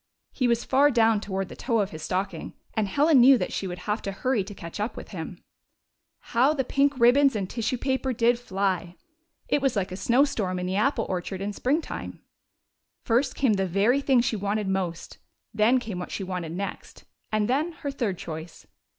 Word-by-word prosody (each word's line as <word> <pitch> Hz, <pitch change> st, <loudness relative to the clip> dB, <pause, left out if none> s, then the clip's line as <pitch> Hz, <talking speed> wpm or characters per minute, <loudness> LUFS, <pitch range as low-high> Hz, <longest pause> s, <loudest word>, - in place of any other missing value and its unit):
He 255 Hz, -, 0 dB
was 235 Hz, -1 st, +1 dB
far 280 Hz, +2 st, +4 dB
down 225 Hz, -4 st, +3 dB
toward 195 Hz, -2 st, -3 dB
the -, -, -10 dB
toe 235 Hz, -2 st, -1 dB
of 200 Hz, -2 st, 0 dB
his 155 Hz, -, -8 dB
stocking, 185 Hz, +5 st, -3 dB, 0.2 s
and 215 Hz, -2 st, 0 dB
Helen 285 Hz, +7 st, +4 dB
knew 260 Hz, +2 st, +8 dB
that -, -, -3 dB
she 195 Hz, -, -2 dB
would 180 Hz, -1 st, -5 dB
have 210 Hz, +2 st, -1 dB
to 195 Hz, -, -4 dB
hurry 220 Hz, +2 st, 0 dB
to 205 Hz, 0 st, -9 dB
catch 170 Hz, +2 st, -8 dB
up 210 Hz, +4 st, -3 dB
with -, -, -8 dB
him. -, -, -6 dB, 1.0 s
How 260 Hz, +6 st, +4 dB
the 270 Hz, -, 0 dB
pink 275 Hz, +1 st, +1 dB
ribbons 260 Hz, +2 st, +5 dB
and 195 Hz, -3 st, -2 dB
tissue 230 Hz, +4 st, -2 dB
paper 265 Hz, +1 st, -1 dB
did 240 Hz, 0 st, +2 dB
36 245 Hz, -, -21 dB
HOME 190 Hz, -, -7 dB
OF -, -, -1 dB
HELEN 195 Hz, -, +5 dB
AND 185 Hz, -, -2 dB
CHRISTOPHER 175 Hz, -, -21 dB, 0.5 s
fly! -, -, +2 dB
It -, -, -4 dB
was 270 Hz, -3 st, +1 dB
like 195 Hz, -2 st, -1 dB
a -, -, -4 dB
snowstorm 220 Hz, -3 st, +1 dB
in 180 Hz, 0 st, -3 dB
an -, -, -2 dB
apple 225 Hz, +2 st, +1 dB
or 180 Hz, -1 st, -1 dB
chard 190 Hz, +1 st, -6 dB
in 205 Hz, +1 st, -3 dB
springtime. 285 Hz, +10 st, -2 dB, 0.8 s
First 250 Hz, +3 st, +1 dB
came 260 Hz, -6 st, +2 dB
tlie 195 Hz, -1 st, 0 dB
very 205 Hz, +10 st, +2 dB
thing 265 Hz, -3 st, +4 dB
she 235 Hz, -, 0 dB
wanted 205 Hz, 0 st, -1 dB
most, 185 Hz, -3 st, -3 dB, 0.3 s
then 220 Hz, +4 st, +4 dB
came 215 Hz, -7 st, -5 dB
what 180 Hz, -, -6 dB
she 195 Hz, -, -4 dB
wanted 180 Hz, -3 st, -4 dB
next, 200 Hz, +3 st, -6 dB, 0.3 s
and 215 Hz, -1 st, +1 dB
then 295 Hz, +7 st, 0 dB
her 285 Hz, -2 st, -5 dB
third 230 Hz, -9 st, -2 dB
choice. 160 Hz, 0 st, -8 dB
220 Hz, 220 wpm, -26 LUFS, 190-260 Hz, 1.0 s, knew